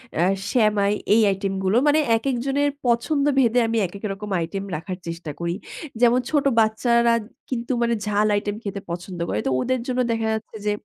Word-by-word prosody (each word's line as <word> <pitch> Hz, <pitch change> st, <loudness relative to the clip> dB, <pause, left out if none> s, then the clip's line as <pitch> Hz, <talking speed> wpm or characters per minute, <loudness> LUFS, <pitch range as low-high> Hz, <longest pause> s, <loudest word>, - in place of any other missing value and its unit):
অ্যা 170 Hz, -, +2 dB, 0.3 s
সেমাই 210 Hz, -4 st, +3 dB, 0.2 s
এই 225 Hz, -, +5 dB
আইটেমগুলো। 195 Hz, +1 st, 0 dB
মানে 300 Hz, +2 st, +4 dB, 0.2 s
একেক 260 Hz, +2 st, -1 dB
জনের 285 Hz, +1 st, +1 dB, 0.2 s
পছন্দভেদে 260 Hz, 0 st, +2 dB
আমি 230 Hz, 0 st, 0 dB
একেকরকম 200 Hz, +2 st, -6 dB
আইটেম 180 Hz, +4 st, -3 dB
রাখার 180 Hz, +3 st, -5 dB
চেষ্টা 165 Hz, -2 st, -5 dB
করি। 170 Hz, +1 st, -2 dB, 0.5 s
যেমন 245 Hz, +1 st, +5 dB
ছোট 290 Hz, -2 st, +1 dB
বাচ্চারা 235 Hz, +2 st, +3 dB, 0.4 s
কিন্তু 240 Hz, 0 st, -3 dB
মানে 235 Hz, 0 st, +2 dB
ঝাল 210 Hz, 0 st, +2 dB
আইটেম 205 Hz, 0 st, -2 dB
খেতে 200 Hz, -1 st, -4 dB
পছন্দ 175 Hz, +1 st, -6 dB
করে। 105 Hz, -, -1 dB
তো -, -, +2 dB
ওদের 255 Hz, 0 st, 0 dB
জন্য 255 Hz, 0 st, -1 dB
দেখা 225 Hz, -1 st, -1 dB
যাচ্ছে 220 Hz, 0 st, -6 dB
যে 210 Hz, -, +2 dB
220 Hz, 165 wpm, -23 LUFS, 195-245 Hz, 0.5 s, এই